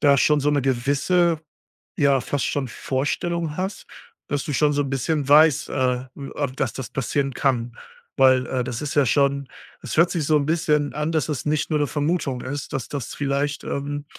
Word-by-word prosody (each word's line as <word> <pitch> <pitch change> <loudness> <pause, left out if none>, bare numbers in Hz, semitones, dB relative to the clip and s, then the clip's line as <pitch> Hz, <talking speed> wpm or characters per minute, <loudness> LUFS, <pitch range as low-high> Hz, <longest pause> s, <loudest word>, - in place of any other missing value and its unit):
da 140 -2 +5
schon 150 +2 +3
so 145 - +2
'ne 145 -2 +1
gewisse 140 +7 +2 0.6
ja, 140 -3 +4
fast 145 -3 -2
schon 140 -3 -1
Vorstellung 150 +6 -2
hast, 190 +2 -4 0.4
dass 145 -1 -2
du 145 - -3
schon 150 +2 +3
so 145 0 +1
'n 135 - -4
bisschen 140 +2 -1
weißt, 150 -1 +5
äh, 125 -1 0
w 140 -1 -7
ah, 145 - 0
dass 130 +1 -2
das 130 - -6
passieren 135 +1 -1
kann, 120 -3 0 0.4
weil, 130 -1 +5
äh, 130 -1 -1
das 120 0 -4
ist 150 - -4
ja 145 -2 +4
schon 140 +2 +1 0.3
es - - -5
hört 170 +2 +5
sich 165 -4 -1
so 155 +1 +4
'n 140 - -1
bisschen 150 -2 +1
an, 150 +2 -2
dass 155 -2 0
es 150 -4 -3
nicht 150 0 0
nur 155 -2 +1
'ne 145 - +1
Vermutung 145 -3 -1
ist, 140 +2 -5
dass 135 -4 -3
das 140 -5 -5
vielleicht, 145 +1 -1
ähm 145 +1 -4
145 Hz, 205 wpm, -23 LUFS, 135-150 Hz, 0.6 s, da